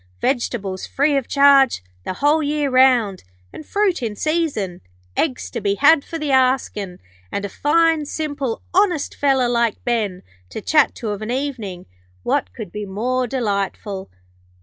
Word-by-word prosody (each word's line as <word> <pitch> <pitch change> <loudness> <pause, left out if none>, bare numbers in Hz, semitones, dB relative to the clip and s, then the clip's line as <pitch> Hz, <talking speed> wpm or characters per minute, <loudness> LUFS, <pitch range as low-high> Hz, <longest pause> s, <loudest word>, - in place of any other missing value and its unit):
Vegetables 205 - -2
free 285 +1 +1
of 270 -3 0
charge 275 - +5 0.2
the - - -2
whole 295 +10 +2
year 295 -1 0
round, 250 -7 +4 0.3
and - - -8
fruit 400 -5 +1
in 220 -3 -3
season. 285 - -1 0.3
Eggs 260 -6 -1
to 235 - -4
be 200 -1 +1
had 285 +4 +5
for 330 - -6
the 300 -3 -2
askin', 255 -8 +1 0.3
and 200 - -2
a - - -4
fine, 325 +5 +2
simple, 285 -5 -3
honest 360 -5 +2
feller 270 -3 +2
like 235 -2 0
Ben, 215 -7 -1 0.3
to - - -6
chat 300 +7 +3
to 225 - -5
of 205 0 -5
an 215 - -5
evening. 240 -9 -4 0.4
What 90 - 0
could 130 - -8
be 210 0 -5
more 250 +6 -1
delightful?' 200 -4 -3
255 Hz, 155 wpm, -20 LUFS, 210-290 Hz, 0.4 s, charge